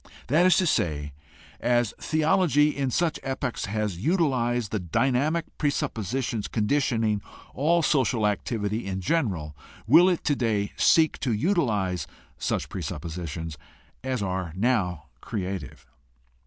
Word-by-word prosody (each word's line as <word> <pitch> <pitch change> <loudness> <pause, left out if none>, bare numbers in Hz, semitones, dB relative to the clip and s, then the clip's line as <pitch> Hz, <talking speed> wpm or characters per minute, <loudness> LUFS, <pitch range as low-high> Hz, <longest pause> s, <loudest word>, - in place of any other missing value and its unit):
That 165 +7 +5
is 180 -3 +5
to 190 - +3
say, 75 - 0 0.5
as 120 -2 +1
theology 155 -1 +2
in 140 -2 -1
such 165 +5 0
epochs 135 -2 -3
has 105 -3 -2
utilized 120 - +1
the 110 - -1
dynamic 130 - +1
presuppositions 130 - -1
con 110 -2 -1
ditioning 115 -6 +1 0.3
all 165 +5 +2
social 125 -8 +2
activity 105 0 -1
in 95 -1 -3
general 90 - -1 0.3
will 165 - +7
it 180 - -1
today 115 -8 0
seek 160 -2 +4
to 130 - -1
utilize 105 - 0 0.3
such - - -1
presuppositions 80 -1 -5 0.4
as 130 -5 -2
are 95 -3 -2
now 95 -6 0 0.2
creative. 95 -2 -5
120 Hz, 120 wpm, -26 LUFS, 95-150 Hz, 0.5 s, will